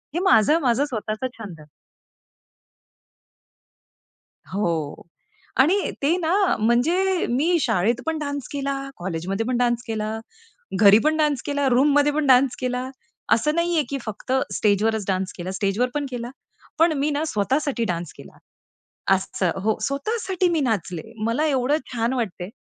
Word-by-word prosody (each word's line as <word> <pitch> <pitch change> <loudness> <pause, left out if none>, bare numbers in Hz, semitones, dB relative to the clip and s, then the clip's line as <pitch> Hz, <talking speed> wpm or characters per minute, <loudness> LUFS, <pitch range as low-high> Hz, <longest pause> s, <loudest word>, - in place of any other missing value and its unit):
हे - - +1
माझं 310 - +5
माझं 255 +1 +2
स्वतःच 215 -5 -4 0.2
छंद 195 -8 -9
आहे. 150 - -17 2.8
हो 190 -2 0 0.9
आणि 365 +9 +3
ते 305 +5 +3
ना 340 -1 -1 0.3
म्हणजे 335 - +2
मी 315 +8 +2
शाळेत 225 -1 +1
पण 320 -1 -1
डान्स 285 -3 -4
केला, 280 -1 -2 0.2
कॉलेजमध्ये 185 +4 -3
पण 250 0 0
डान्स 240 -1 +1
केला, 220 -1 -3 0.6
घरी 205 0 +8
पण 310 0 +3
डान्स 300 -4 +1
केला, 285 -2 0
रूममध्ये 290 +3 +4
पण 300 -1 0
डान्स 260 0 +4
केला. 250 0 -2 0.4
असं 300 +7 +3
नाहीये 340 -2 +1
की 275 +1 -3
फक्त 215 +4 -5 0.2
स्टेजवरच 210 +1 +1
डान्स 190 -1 -1
केला. 180 +1 -5
स्टेजवर 200 +5 0
पण 290 -1 -1
केला, 240 -1 -5 0.5
पण 330 +1 +4
मी 290 +2 +1
ना 295 +1 -1
स्वतः 215 +7 +1
साठी 255 -5 -1
डान्स 170 -1 -5
केला. - - -14 0.8
असं 185 -1 -1
हो, 220 0 +1
स्वतः 280 - -1
साठी 370 -2 0
मी 330 -2 +1
नाचले 185 - -2
मला 235 +8 +1
एवढं 275 0 +1
छान 235 0 0
वाटतंय. 195 -7 -3
250 Hz, 145 wpm, -23 LUFS, 215-295 Hz, 2.8 s, घरी